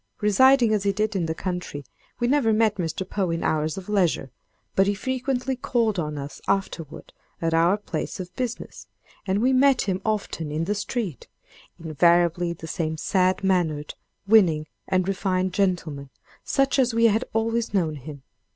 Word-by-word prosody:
Residing 235 +3 +5
as 210 - +1
he 200 0 +1
did 210 +1 -1
in 175 -4 0
the 160 - -2
country, 180 -6 -5 0.3
we 240 - +1
never 255 -3 +3
met 215 -1 +2
Mr. 180 +1 -3
Poe 190 -3 -1
in 165 0 -2
hours 155 +1 0
of 190 - -7
leisure; 180 -10 +1 0.4
but 195 0 +3
he 205 - +1
frequently 260 +3 -2
called 230 -5 0
on 150 -2 -3
us 140 0 -7
afterward 180 -6 -3 0.3
at 165 0 -1
our 170 +4 +4
place 205 - -5
of 180 -1 -7
business, 250 -2 -5 0.4
and 195 +4 +1
we 260 +1 +3
met 265 0 +4
him 190 -1 -2
often 200 -8 -2
in 155 +2 -1
the 200 +5 0
street—invariably 170 - -1
the 165 -1 -8
same 160 -1 -3
sad 185 +3 +1
mannered, 165 -6 0 0.3
winning 180 -8 +4 0.2
and 185 0 +1
refined 185 -1 0
gentleman, 165 -8 -1 0.3
such 275 0 +1
as 250 -3 +2
we 230 0 +4
had 225 +2 +3
always 225 +1 0
known 165 -7 0
him. 140 0 -10
190 Hz, 165 wpm, -24 LUFS, 165-220 Hz, 0.4 s, Residing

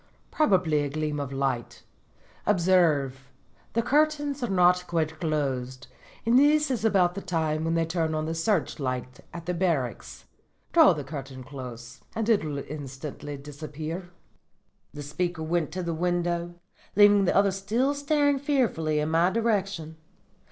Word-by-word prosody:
Probably 180 - +2
a 145 - -2
gleam 150 0 -2
of 140 -2 -4
light. 135 -3 -2 0.6
Observe, 160 -9 +2 0.4
the 230 - +1
curtains 290 0 +1
are 240 - -1
not 180 -1 +3
quite 160 -2 -1
closed, 130 -5 -2 0.4
and 235 +3 +5
this 300 0 +4
is 240 -4 -2
about 190 -5 +3
the 200 - -5
time 160 -3 -1
when 165 +1 0
they 165 0 +2
turn 165 -1 -1
on 155 0 -1
the 160 - -2
searchlight 140 - -1
at 170 -1 -8
the 180 - -1
barracks. 165 -9 -2 0.5
Draw 320 - +7
the 150 -3 -5
curtains 135 -2 -8
close 125 -3 -9
and 225 -1 -1
it 220 -6 +4
will 150 -2 -3
instantly 145 0 -7
disappear.' 155 +5 -7 0.8
"The 145 - -8
speaker 165 +3 -3
went 165 -1 -1
to 185 0 -3
the 170 -1 -2
window, 175 0 -1 0.4
leaving 205 -1 +6
the - - +1
other 200 0 +4
still 220 +9 0
staring 285 0 +1
fearfully 235 - +1
in 150 +1 -1
my 165 +2 +4
direction. 195 -7 -1
165 Hz, 150 wpm, -27 LUFS, 145-200 Hz, 0.8 s, Draw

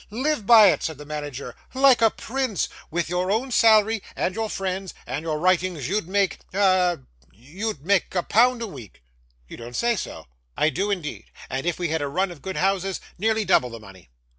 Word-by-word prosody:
'Live 250 0 -2
by 220 -5 +8
it!' - - -2
said 160 -3 -3
the 150 - -10
manager. 145 -3 -6 0.2
'Like 265 -2 +5
a 225 - +6
prince! 250 - -2 0.2
With 170 +1 -1
your 180 +2 -1
own 235 +6 0
salary, 220 -1 +4
and 185 - -1
your 220 +1 -3
friend's, 190 -1 -4
and 130 +5 -4
your 160 -1 -2
writings, 180 -3 +1
you'd 200 -2 -1
make 195 0 0 0.2
ah! 185 -3 +3 0.3
you'd 155 - -6
make 195 0 +1
a 180 - +1
pound 240 +4 +3
a - - -3
week!' 120 - -12 0.4
'You - - -10
don't 120 +1 -9
say 235 - +1
so!' - - -6 0.3
'I 155 - +3
do 195 +5 -1
indeed, 180 -7 -4 0.3
and 135 +5 -3
if 175 - 0
we 175 -2 -2
had 160 0 -1
a 145 - -1
run 180 +6 -1
of 160 -5 -12
good 190 -1 -5
houses, 195 0 0 0.2
nearly 220 +1 +1
double 125 - +3
the 115 -1 -9
money. 95 - -15
185 Hz, 200 wpm, -24 LUFS, 155-215 Hz, 0.4 s, by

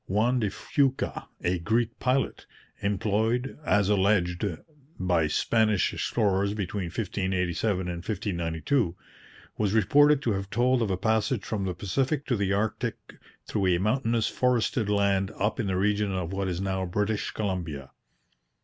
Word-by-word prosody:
Juan 115 +6 +2
de 105 -3 0
Fuca, 135 +6 -1 0.2
a 90 +1 +1
Greek 115 +5 0
pilot, 130 +1 0 0.3
employed, 110 +6 0
as 105 -8 +2
alleged, 95 -3 +2 0.6
by 90 -4 +2
Spanish 110 +4 +2
explorers 100 -2 0
between 100 -1 -3
1587 95 +1 -1
and 90 -1 -4
1592, 90 - -1 0.6
was 105 -2 +1
reported 145 +7 +5
to 115 - +1
have 95 0 -4
told 125 +3 +2
of 110 - 0
a 95 - 0
passage 110 +2 +1
from 100 -3 -2
the 90 -2 -2
Pacific 135 - -1
to 125 - +1
the 100 -2 0
Arctic 110 +3 -1 0.5
through 100 -3 0
a 90 -1 +3
mountainous 115 +3 +1
forested 120 -3 +1
land 100 -2 +2
up 105 +5 0
in 110 - 0
the 95 -1 0
region 105 +1 +1
of 90 -1 -3
what 95 0 -1
is 90 -1 -2
now 95 -1 -1
British 105 +4 -1
Columbia. 85 -10 -4
100 Hz, 145 wpm, -27 LUFS, 95-115 Hz, 0.6 s, reported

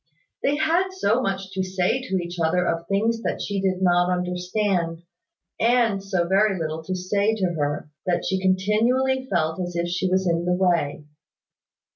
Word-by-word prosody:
They 280 - +2
had 325 +5 +2
so 245 - +1
much 195 -3 -3
to 190 -1 -2
say 185 +6 0
to 255 -7 -3
each 175 -1 -3
other 180 +2 +2
of 165 0 -2
things 225 +3 +1
that - - -2
she 200 -1 -2
did 190 -1 0
not 175 0 +3
understand, 180 -1 -1 0.6
and 230 -4 +2
so 190 -3 0
very 195 +1 +3
little 160 0 -3
to 185 - -2
say 200 +4 0
to 185 -5 -1
her, 145 -1 -2 0.2
that 175 - 0
she 190 0 0
continually 230 +8 +1
felt 160 -1 0
as 175 -1 -4
if 170 0 0
she 180 +1 -1
was 190 0 +1
in 170 0 +1
the 180 0 +2
way. 170 -5 0
185 Hz, 175 wpm, -24 LUFS, 175-210 Hz, 0.6 s, not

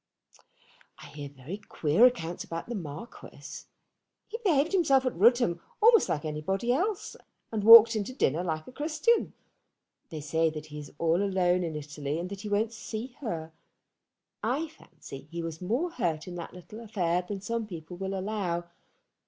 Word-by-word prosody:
"I - - -12
hear 145 -1 -8
very 145 +8 -8
queer 190 +2 +4
accounts 175 -9 -3
about 165 0 -5
the 240 - -4
Marquis. 165 +1 -8 0.6
He 460 - -6
behaved 315 -5 +3
himself 280 -9 +3
at 255 - 0
Rudham 210 -3 +4 0.2
almost 455 0 +6
like 150 0 -1
anybody 190 +10 -1
else, 375 - -1 0.4
and 215 -2 -2
walked 230 +1 +10
into 215 +2 -2
dinner 170 - 0
like 155 -3 -3
a - - -11
Christian. 315 - +1 0.8
They 160 - -6
say 160 +2 +1
that 155 -1 -7
he 150 -1 -8
is 145 -1 -9
all 165 +3 +2
alone 185 -2 +2
in 165 -2 -3
Italy, 150 0 -4
and 175 +2 -4
that 200 -1 -6
he 210 - -5
won't 215 +3 +1
see 230 +3 -6
her. 165 - -5 0.9
I 280 +8 -1
fancy 140 - -12
he 170 +1 -5
was 165 0 -6
more 245 - -1
hurt 165 - -2
in 180 - -6
that 175 0 -7
little 180 +5 -11
affair 180 -6 0
than 195 +2 -6
some 225 +3 -3
people 170 -2 -8
will 190 +1 -3
allow. 190 -3 -2
190 Hz, 170 wpm, -29 LUFS, 165-235 Hz, 0.9 s, walked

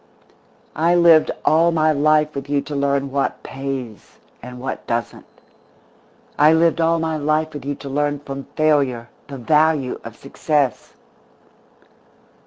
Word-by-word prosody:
_" - - -30 0.4
"I 170 +2 +2
lived 170 -2 +5 0.2
all 165 +2 +4
my 155 -1 +2
life 150 +1 +2
with 140 0 -7
you 145 -1 +1
to 145 +1 -7
learn 140 -1 -1
what 140 0 -2
pays, 135 -5 -7 0.2
and 125 +1 -10
what 130 +1 -6
doesn't. 115 -2 -4 1.1
I 150 +2 +6
lived 165 +1 +2
all 165 +1 +2
my 160 -1 -2
life 155 +1 -1
with 145 -3 -8
you 145 0 -3
to 140 - -11
learn 145 +1 -1
from 140 -1 -8
failure 140 -7 +1 0.2
the 140 - -8
value 150 +1 +1
of 115 -1 -9
success." 140 0 -2
145 Hz, 145 wpm, -20 LUFS, 135-155 Hz, 1.1 s, I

